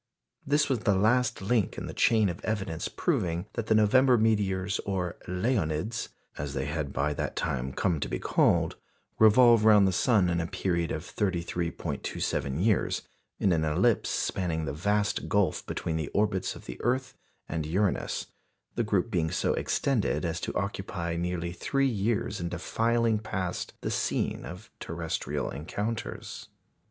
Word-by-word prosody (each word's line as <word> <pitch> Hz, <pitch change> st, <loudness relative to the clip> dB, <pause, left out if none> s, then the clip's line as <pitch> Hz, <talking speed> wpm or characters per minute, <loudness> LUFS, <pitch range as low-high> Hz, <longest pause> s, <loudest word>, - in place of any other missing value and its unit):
This 145 Hz, +2 st, +3 dB
was 130 Hz, -4 st, +1 dB
the 105 Hz, -2 st, +2 dB
last 110 Hz, +2 st, +2 dB
link 105 Hz, 0 st, +1 dB
in -, -, -4 dB
the -, -, -6 dB
chain 110 Hz, -3 st, +3 dB
of 85 Hz, -1 st, -5 dB
evidence 100 Hz, -7 st, -2 dB
proving 85 Hz, +1 st, -1 dB
that 115 Hz, -, -3 dB
the 110 Hz, -, +4 dB
November 125 Hz, +4 st, +5 dB
meteors 100 Hz, -3 st, +1 dB
or 90 Hz, -3 st, -2 dB
"Leonids," 90 Hz, 0 st, -1 dB, 0.3 s
as 70 Hz, 0 st, -4 dB
they 65 Hz, -, -1 dB
had 75 Hz, -1 st, -3 dB
by 70 Hz, +3 st, 0 dB
that -, -, -3 dB
time 65 Hz, +1 st, -2 dB
come 85 Hz, +2 st, 0 dB
to -, -, -3 dB
be -, -, -1 dB
called -, -, +2 dB, 0.4 s
revolve 115 Hz, +1 st, +7 dB
round 105 Hz, -3 st, +7 dB
the -, -, +2 dB
sun 100 Hz, 0 st, +3 dB
in 85 Hz, -1 st, +1 dB
a 85 Hz, -, -3 dB
period 85 Hz, -2 st, -1 dB
of 80 Hz, -, -3 dB
33·27 85 Hz, -4 st, -2 dB
years, 110 Hz, -4 st, +1 dB, 0.4 s
in 95 Hz, -, +3 dB
an 80 Hz, -2 st, +2 dB
ellipse 90 Hz, +9 st, +2 dB
spanning 80 Hz, -4 st, -1 dB
the 70 Hz, -, -3 dB
vast 105 Hz, +6 st, 0 dB
gulf 100 Hz, -2 st, +1 dB
between 80 Hz, -1 st, -2 dB
the 80 Hz, -3 st, -3 dB
orbits 100 Hz, -3 st, +1 dB
of -, -, -12 dB
the -, -, -8 dB
earth 125 Hz, +2 st, 0 dB, 0.3 s
and 80 Hz, -1 st, -3 dB
Uranus, 95 Hz, +5 st, 0 dB, 0.5 s
the -, -, 0 dB
group 105 Hz, 0 st, 0 dB
being 85 Hz, -5 st, +1 dB
so -, -, 0 dB
extended 125 Hz, -8 st, 0 dB
as 85 Hz, 0 st, -2 dB
to -, -, -2 dB
occupy 90 Hz, -3 st, -3 dB
nearly 85 Hz, 0 st, -2 dB
three 135 Hz, +10 st, 0 dB
years 105 Hz, -3 st, -1 dB
in 85 Hz, -, -2 dB
defiling 115 Hz, +5 st, +1 dB
past 95 Hz, -4 st, -3 dB
the -, -, -2 dB
scene -, -, -1 dB
of 90 Hz, +8 st, -9 dB
terrestrial 85 Hz, -1 st, -3 dB
encounters. 105 Hz, +10 st, -5 dB
95 Hz, 160 wpm, -28 LUFS, 85-110 Hz, 0.5 s, revolve